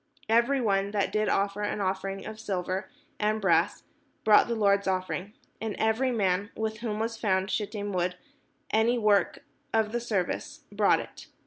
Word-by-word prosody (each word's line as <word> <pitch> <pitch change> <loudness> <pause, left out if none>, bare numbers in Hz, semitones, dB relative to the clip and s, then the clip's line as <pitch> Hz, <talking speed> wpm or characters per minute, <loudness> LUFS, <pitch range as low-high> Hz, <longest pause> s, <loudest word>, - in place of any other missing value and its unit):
Every 235 +5 +3
one 200 -4 +1
that 200 -2 0
did 215 0 +1
offer 200 +1 0
an 205 0 -2
offering 195 0 -2
of 215 0 -7
silver 190 -1 -3 0.3
and 215 +1 +1
brass 195 - +2 0.4
brought 210 -1 +6
the 235 - -1
Lord's 200 -2 +2
offering: 185 +1 -2 0.3
and 220 -2 -3
every 220 +4 +2
man, 200 -3 +1
with 220 0 -3
whom 220 -2 -3
was 225 +1 -2
found 190 -2 0
shittim 205 -1 -3
wood 180 0 0
for - - -29 0.5
any 225 +3 +3
work 210 -3 +2 0.3
of 220 -1 +1
the 240 - -1
service, 235 - -2
brought 205 0 +3
it. - - -12
210 Hz, 170 wpm, -28 LUFS, 195-220 Hz, 0.5 s, brought